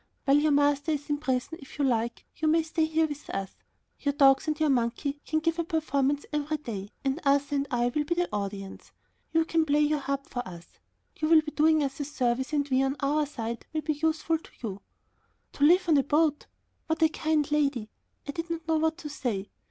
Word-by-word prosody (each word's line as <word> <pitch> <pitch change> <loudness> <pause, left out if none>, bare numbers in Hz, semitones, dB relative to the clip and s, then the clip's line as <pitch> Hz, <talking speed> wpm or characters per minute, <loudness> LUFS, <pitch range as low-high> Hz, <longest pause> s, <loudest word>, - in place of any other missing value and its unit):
While 280 +1 +5
your 305 0 +2
master 290 +2 +2
is 295 0 -4
in 290 - 0
prison, 265 +3 -2
if 275 - -12
you 285 - +1
like, 235 -2 -1
you 315 - -1
may 320 +1 +4
stay 320 0 0
here 320 0 +2
with 295 -1 -7
us. 195 -1 -3 0.5
Your 285 -1 0
dogs 270 +1 +5
and 305 0 -1
your 310 -2 +3
monkey 270 +4 -1
can 315 0 0
give 330 +1 0
a - - +2
performance 290 -3 0
every 300 +1 -1
day, 210 -9 -6 0.2
and 270 +5 0
Arthur 285 0 +2
and 280 0 -1
I 240 -1 +1
will 300 - +1
be 340 +4 -1
the 350 0 +1
audience. 200 -1 -5 0.4
You 325 0 +3
can 325 0 +2
play 300 -1 +2
your 300 0 +2
harp 275 0 -3
for 245 - -4
us. 170 -1 -12 0.4
You 310 - 0
will 320 -1 +7
be 305 0 -6
doing 310 0 +3
us 275 0 -3
a 290 - -2
service 260 -2 -1
and 290 -2 0
we, 260 0 +3
on 270 +1 0
our 295 +1 +1
side, 235 -4 -5
may 310 - +1
be 305 +1 -1
useful 320 +1 0
to - - -17 0.2
you." 195 -1 -6 0.7
To 285 - -2
live 360 +4 +5
on 315 -3 +5
a - - +2
boat! 300 +1 +1 0.4
What 320 0 +1
a - - +7
kind 310 -2 0
lady. 275 -7 0 0.4
I - - -2
did 330 +3 -5
not 330 -1 -4
know 320 -1 +2
what 320 +1 +1
to 320 - -7
say. 220 -9 -3
290 Hz, 225 wpm, -28 LUFS, 270-315 Hz, 0.7 s, will